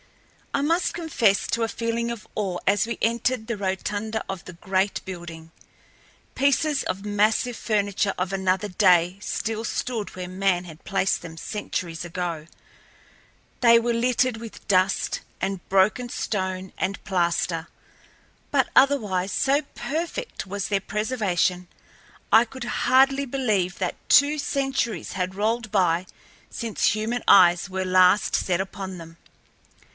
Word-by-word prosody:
I - - +1
must 335 +4 +1
confess 235 - +1
to 230 - 0
a - - +1
feeling 230 +1 -2
of 235 -3 -8
awe 195 -4 -1
as 200 +1 +3
we 235 - -4
entered 235 +1 0
the 235 - -2
rotunda 205 +3 -2
of 195 -2 -5
the - - -8
great 190 +2 -1
building. 170 -3 -8 0.8
Pieces 280 +1 +2
of 195 +2 -4
massive 215 +4 +1
furniture 205 -2 0
of 185 +1 -2
another 190 +1 0
day 180 -2 +3
still 225 +1 -3
stood 230 -3 -3
where 180 -1 -5
man 185 -1 0
had 160 -2 -12
placed 195 -1 0
them 165 -1 -10
centuries 175 -3 -4
ago. 170 -2 -4 1.1
They 235 -1 +7
were 235 +1 0
littered 245 0 +1
with 225 -1 -10
dust 185 0 +1 0.2
and 190 -2 -3
broken 205 +6 +2
stone 190 -4 -3
and 190 +2 -2
plaster, 170 -3 0 0.8
but, - - +2
otherwise, 205 -9 +3
so 275 +2 +2
perfect 335 - -4
was 200 +1 -3
their 200 -2 0
preservation 195 -5 -1 0.6
I 225 - +7
could 260 +2 -8
hardly 270 +3 +3
believe 215 -9 0
that 185 -2 -2
two 290 +2 +6
centuries 270 -5 -2
had 185 0 -3
rolled 220 +2 -1
by 180 -3 +2 0.4
since 230 -3 -1
human 225 +3 -2
eyes 175 0 +6
were 190 0 -2
last 185 +2 +4
set 180 -2 0
upon 190 -1 -5
them. 165 -1 -11
200 Hz, 135 wpm, -24 LUFS, 185-235 Hz, 1.1 s, They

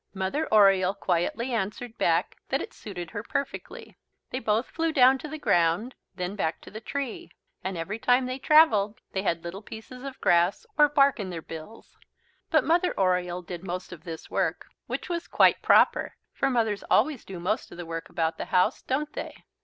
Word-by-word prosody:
Mother 195 +12 -1
Oriole 195 -2 +5
quietly 200 +7 -1
answered 225 +2 -3
back 170 +3 +1
that 270 - +1
it - - -7
suited 175 -5 -8
her 205 - -4
perfectly. 275 +5 -5 0.3
They 255 - -2
both 220 0 +1
flew 330 -1 0
down 265 -3 +5
to 305 - -7
the 310 +1 -6
ground, 175 - +2 0.2
then 180 +1 -4
back 160 -5 -1
to - - -13
the 215 +2 -8
tree. 275 +1 -5 0.3
And 190 -1 -3
every 195 +7 -4
time 250 +2 +3
they 255 +1 -4
travelled 250 -8 +4
they 190 - -1
had 170 -4 -1
little 175 +4 -6
pieces 225 +4 -10
of 275 0 -8
grass 175 - +2
or 295 -1 +6
bark 280 -3 +4
in 195 -3 -4
their 165 -3 -6
bills. 165 +8 -11 0.5
But 310 -2 +4
Mother 345 - +1
Oriole 180 -1 +1
did 175 0 -7
most 180 0 -5
of 160 -2 -12
this 165 -3 -7
work, - - -1 0.2
which - - -4
was 345 -2 -3
quite - - +4
proper, - - +4 0.2
for 275 - 0
mothers 220 -5 0
always 260 +3 +2
do 190 -2 -8
most 195 +6 -2
of - - -10
the 175 - -6
work 165 0 -6
about 165 -1 -1
the - - -3
house, 180 0 +2
don't 295 +3 -2
they? - - -7
210 Hz, 195 wpm, -27 LUFS, 180-260 Hz, 0.5 s, or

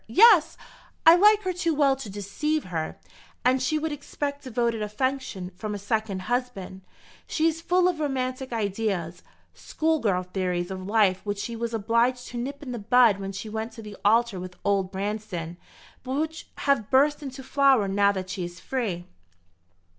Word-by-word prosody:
Yes, 345 - +6 0.5
I 325 +1 +10
like 420 +3 +5
her 370 -1 -1
too 340 -3 0
well 280 -2 +4
to 260 -6 -7
deceive 205 +11 -2
her. 165 -4 -4 0.5
And 255 +1 +3
she 260 +5 +1
would 315 +1 -2
expect 285 0 -4
devoted 235 -3 -1
affection 210 -4 -2
from 210 +2 -4
a - - -3
second 205 -2 -2
husband. 240 -5 -3 0.5
She 315 - 0
is 325 0 +1
full 360 +1 +3
of 355 -4 -1
romantic 260 -2 -2
ideas, 200 -6 -2 0.3
school 320 0 -1
girl 190 -6 +1
theories 180 -1 -2
of 185 0 -6
life 200 -4 +3
which 205 -1 -3
she 230 +3 -4
was 230 0 -3
obliged 235 +3 +1
to 240 - -5
nip 280 +4 -5
in 260 - -6
the 240 - -4
bud 225 -1 +4
when 195 0 -4
she 195 +3 -6
went 220 +1 -4
to 225 - -10
the 210 -1 -9
altar 225 -1 +3
with 180 0 -8
old 195 -2 +1
Branston, 195 -4 -4 0.4
but 260 0 -5
which 320 +1 -3 0.2
have 270 -7 +2
burst 290 +3 +3
into 270 -1 -7
flower 270 -5 +3
now 200 +1 +3
that 185 -2 -5
she 185 - -3
is 175 +1 -7
free." 195 -7 -3
230 Hz, 175 wpm, -26 LUFS, 195-275 Hz, 0.5 s, I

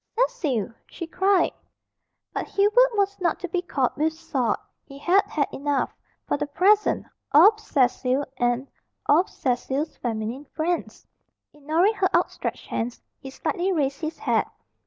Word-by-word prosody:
"Cecil!" 270 - 0 0.2
she 335 - -7
cried. 375 +2 +2 0.8
But - - -3
Hubert 430 +4 +3
was 400 -1 0
not 340 -3 +1
to 360 - -3
be 350 +1 -1
caught 275 -8 -1
with 315 +2 +1
salt. 265 -8 -1 0.3
He 275 -1 -12
had 355 +7 +4
had 290 -2 0
enough, 285 -1 -1 0.3
for - - +1
the 295 0 -2
present, 390 +8 +3 0.3
of 400 +9 +7
Cecil 265 - +1
and 245 +2 0 0.4
of 330 +6 +4
Cecil's 265 +4 -2
feminine 230 +4 -3
friends. 340 +2 -2 0.5
Ignoring 315 +8 +2
her 390 -3 +1
outstretched - - -1
hands, 235 +1 -3 0.2
he 270 - -8
slightly 360 +7 -1
raised 280 -4 0
his 315 0 -4
hat. - - 0
310 Hz, 140 wpm, -25 LUFS, 270-375 Hz, 0.8 s, of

